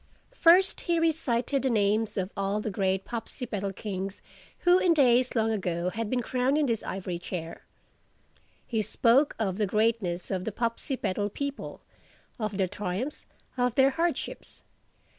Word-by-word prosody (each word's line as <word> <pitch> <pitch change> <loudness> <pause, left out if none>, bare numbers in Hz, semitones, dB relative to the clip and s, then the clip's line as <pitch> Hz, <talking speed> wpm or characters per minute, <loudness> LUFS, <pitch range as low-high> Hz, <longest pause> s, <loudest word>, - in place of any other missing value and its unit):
First 360 +3 +5
he 340 - +3
recited 285 -5 +1
the 265 - +1
names 215 -1 +1
of 190 +1 -2
all 200 +1 -1
the 210 0 -3
great 190 -1 0
Popsipetel 220 -3 -4
kings 195 -1 -5 0.4
who 355 +1 +5
in 345 -3 +3
days 255 -3 +4
long 225 -1 +2
ago 180 -4 -1
had 225 0 -3
been 245 0 0
crowned 255 +4 +1
in 305 - +3
this 230 -4 0
ivory 185 -2 -4
chair. 170 -2 -6 1.0
He 225 -2 -1
spoke 245 +6 +3
of 195 -4 -1
the 210 -2 +1
greatness 210 -4 0
of 185 -2 -1
the 220 - -3
Popsipetel 230 -2 -2
people, 280 0 -5 0.6
of 215 -3 -2
their 190 -2 +2
triumphs, 205 +9 -4 0.3
of 245 -1 +1
their 270 0 +5
hardships. 335 +4 -3
225 Hz, 150 wpm, -28 LUFS, 195-260 Hz, 1.0 s, First